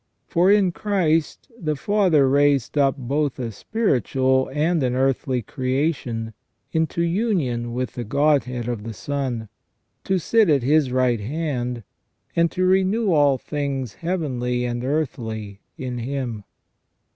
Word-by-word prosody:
For 180 Hz, +3 st, +3 dB
in 200 Hz, -3 st, +4 dB
Christ 175 Hz, -, 0 dB
the 155 Hz, -9 st, -2 dB
Father 185 Hz, -6 st, +3 dB
raised 140 Hz, -1 st, +2 dB
up 140 Hz, -2 st, +3 dB
both 140 Hz, +2 st, -1 dB
a 120 Hz, -3 st, -4 dB
spiritual 130 Hz, -, +1 dB
and 155 Hz, +3 st, +1 dB
an 125 Hz, -1 st, 0 dB
earthly 130 Hz, -1 st, 0 dB
creation 130 Hz, -3 st, -2 dB, 0.4 s
into 160 Hz, +1 st, 0 dB
union 170 Hz, -, 0 dB
with 125 Hz, +1 st, -3 dB
the 120 Hz, -, -4 dB
Godhead 130 Hz, -1 st, +1 dB
of 120 Hz, -3 st, -3 dB
the 115 Hz, 0 st, -7 dB
Son, 130 Hz, -2 st, -3 dB, 0.6 s
to 190 Hz, -, +1 dB
sit 215 Hz, +3 st, +3 dB
at 140 Hz, -5 st, +3 dB
His 145 Hz, 0 st, +3 dB
right 125 Hz, -2 st, +2 dB
hand, 125 Hz, -1 st, -3 dB, 0.5 s
and 170 Hz, 0 st, +3 dB
to 185 Hz, +2 st, -1 dB
renew 190 Hz, +3 st, +2 dB
all 145 Hz, -3 st, +4 dB
things 135 Hz, -4 st, -3 dB
heavenly 125 Hz, -9 st, -2 dB
and 120 Hz, 0 st, -3 dB
earthly 115 Hz, -8 st, -3 dB, 0.2 s
in 125 Hz, -2 st, -4 dB
Him. 120 Hz, -4 st, -4 dB
135 Hz, 135 wpm, -23 LUFS, 125-165 Hz, 0.6 s, in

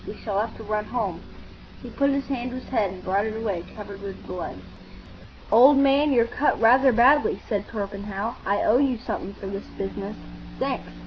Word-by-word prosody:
We 210 Hz, -, -6 dB
shall 200 Hz, -3 st, -1 dB
have 220 Hz, +2 st, -2 dB
to 225 Hz, -, -9 dB
run 210 Hz, 0 st, -2 dB
home." 200 Hz, -8 st, -3 dB, 0.6 s
He -, -, -9 dB
put 280 Hz, 0 st, +1 dB
his 275 Hz, 0 st, 0 dB
hand 255 Hz, -2 st, -3 dB
to 250 Hz, -, -7 dB
his -, -, -14 dB
head 215 Hz, -7 st, +1 dB
and 185 Hz, -1 st, -10 dB
brought 200 Hz, +3 st, 0 dB
it 220 Hz, 0 st, -4 dB
away 200 Hz, -6 st, -2 dB
covered 200 Hz, -1 st, -9 dB
with 200 Hz, -1 st, -8 dB
blood. 180 Hz, -, -5 dB, 1.0 s
"Old 260 Hz, +6 st, +8 dB
man, 280 Hz, +2 st, +4 dB
you're 235 Hz, -3 st, +4 dB
cut 285 Hz, +5 st, 0 dB
rather 255 Hz, +4 st, +6 dB
badly," 255 Hz, +6 st, +4 dB
said 205 Hz, -3 st, -2 dB
Torpenhow. 200 Hz, +1 st, -4 dB
"I 200 Hz, +1 st, 0 dB
owe 235 Hz, +4 st, +4 dB
you 270 Hz, -3 st, +2 dB
something 200 Hz, -4 st, -5 dB
for -, -, -10 dB
this 195 Hz, +1 st, -6 dB
business. 195 Hz, +1 st, -5 dB, 0.4 s
Thanks. -, -, -3 dB
220 Hz, 195 wpm, -24 LUFS, 200-255 Hz, 1.0 s, Old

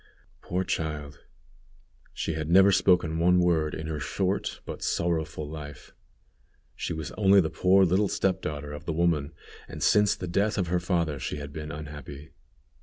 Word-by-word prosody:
Poor 90 Hz, +1 st, -2 dB
child! 75 Hz, -4 st, -4 dB, 0.9 s
she 80 Hz, -, -3 dB
had 80 Hz, 0 st, -4 dB
never 95 Hz, +3 st, +6 dB
spoken 90 Hz, -4 st, +3 dB
one 90 Hz, +2 st, +4 dB
word 80 Hz, -3 st, +1 dB
in 80 Hz, -, -6 dB
her 80 Hz, -1 st, -3 dB
short 95 Hz, +7 st, -2 dB
but -, -, -7 dB
sorrowful 80 Hz, -3 st, -1 dB
life. 75 Hz, -2 st, -9 dB, 0.8 s
She -, -, -4 dB
was 80 Hz, -2 st, -4 dB
only 100 Hz, -1 st, +6 dB
the 80 Hz, -4 st, +1 dB
poor 95 Hz, +3 st, +4 dB
little 95 Hz, +4 st, +2 dB
step 95 Hz, -1 st, 0 dB
daughter 75 Hz, -1 st, -5 dB
of 75 Hz, -, -8 dB
the 80 Hz, -, -2 dB
woman, 80 Hz, -3 st, +1 dB, 0.4 s
and -, -, -6 dB
since 105 Hz, -1 st, +4 dB
the 90 Hz, -, -6 dB
death 100 Hz, +5 st, 0 dB
of 90 Hz, -4 st, -1 dB
her 90 Hz, 0 st, +1 dB
father 85 Hz, -5 st, -1 dB
she 65 Hz, -, -4 dB
had 70 Hz, 0 st, -7 dB
been 75 Hz, 0 st, -6 dB
unhappy. 75 Hz, -1 st, -9 dB
80 Hz, 170 wpm, -27 LUFS, 75-90 Hz, 0.9 s, never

